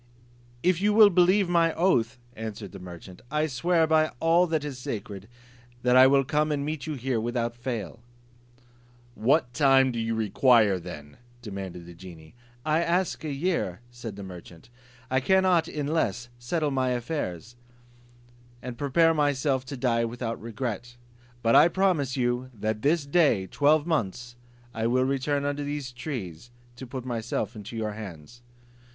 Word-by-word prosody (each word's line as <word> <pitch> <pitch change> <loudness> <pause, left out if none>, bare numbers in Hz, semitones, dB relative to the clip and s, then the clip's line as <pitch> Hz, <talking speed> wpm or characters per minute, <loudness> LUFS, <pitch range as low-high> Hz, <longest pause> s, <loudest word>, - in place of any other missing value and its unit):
"If 180 0 +2
you 210 +1 +3
will 210 -1 +7
believe 185 +2 +4
my 170 -2 +2
oath," 130 -9 +2 0.2
answered 110 -3 -7
the - - -10
merchant, 90 0 -11
"I 150 +1 +1
swear 165 +4 +1
by 155 0 +3
all 170 +2 +4
that 160 -3 -1
is 135 -3 -6
sacred, 105 -4 -6 0.6
that 125 0 +3
I 130 +1 +8
will 135 0 +4
come 150 +3 0
and 140 -1 -1
meet 155 -2 -4
you 155 - -3
here 125 -3 -1
without 120 0 -2
fail." 120 -4 -5 1.1
"What 125 +2 +1
time 135 -2 +4
do 120 - -4
you 115 0 -1
require 110 -2 +3
then?" 75 -4 -10 0.3
demanded 95 -5 -7
the 85 - -11
genie. 85 -2 -13 0.3
"I 155 +1 +2
ask 175 +1 0
a 155 - -3
year," 140 - -2
said 120 -4 -8
the 100 - -8
merchant; 90 +1 -11 0.4
"I 130 - +3
cannot 185 +2 +3
in 150 -3 -4
less 120 -7 -1
settle 150 +5 -1
my 130 -1 0
affairs, 120 - -4 1.0
and 125 -1 -8
prepare 165 +4 +3
myself 140 -3 0
to 135 +1 -7
die 120 -2 +1
without 115 0 -4
regret. 120 +1 -5 0.5
But 115 0 +3
I - - +8
promise 175 -8 0
you, 125 0 -1
that 110 +1 -2
this 150 +2 +2
day 140 - +3
twelve 145 - +2
months 120 - -2 0.4
I 115 0 -1
will 130 +2 +2
return 140 +1 -1
under 145 0 -2
these 145 -3 -4
trees, 120 - -6 0.3
to 130 - -8
put 130 0 -6
myself 115 -1 -3
into 105 +2 -8
your 110 -1 -2
hands." 105 +1 -10
130 Hz, 160 wpm, -26 LUFS, 115-150 Hz, 1.1 s, I